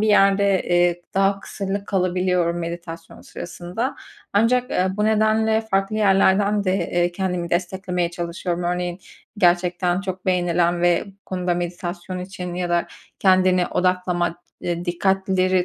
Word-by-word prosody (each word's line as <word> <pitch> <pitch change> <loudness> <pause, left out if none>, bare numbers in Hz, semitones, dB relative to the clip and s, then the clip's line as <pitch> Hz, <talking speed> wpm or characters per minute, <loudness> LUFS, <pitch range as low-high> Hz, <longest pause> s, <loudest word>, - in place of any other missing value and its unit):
bir 215 - +2
yerde, 200 -1 +4
eee, 175 0 +2
daha 195 +1 +2
kısırlık 200 0 -4
kalabiliyorum 180 -2 +1
meditasyon 170 -1 -7
sırasında. 180 +9 -5 0.4
Ancak, 245 +5 +2
eee, 185 - +1
bu 210 - +1
nedenle 220 +1 +3
farklı 195 -1 -1
yerlerden 200 0 +3
de, 185 0 +2
eee, 175 -2 0
kendimi 180 -2 -2
desteklemeye 180 0 -1
çalışıyorum. 175 0 -3
Örneğin, 180 +1 -2 0.4
gerçekten 180 0 +2
çok 190 -1 -6
beğenilen 175 -1 +1
ve 175 -1 +3
bu 200 - -13
konuda 180 -1 -1
meditasyon 175 +1 -4
için 180 -1 -6
ya 180 0 -2
da 175 0 +1 0.3
kendini 185 -1 +4
odaklama, 180 -2 0 0.3
eee, 175 0 -3
dikkatleri 185 0 +1
180 Hz, 130 wpm, -22 LUFS, 175-195 Hz, 0.4 s, yerde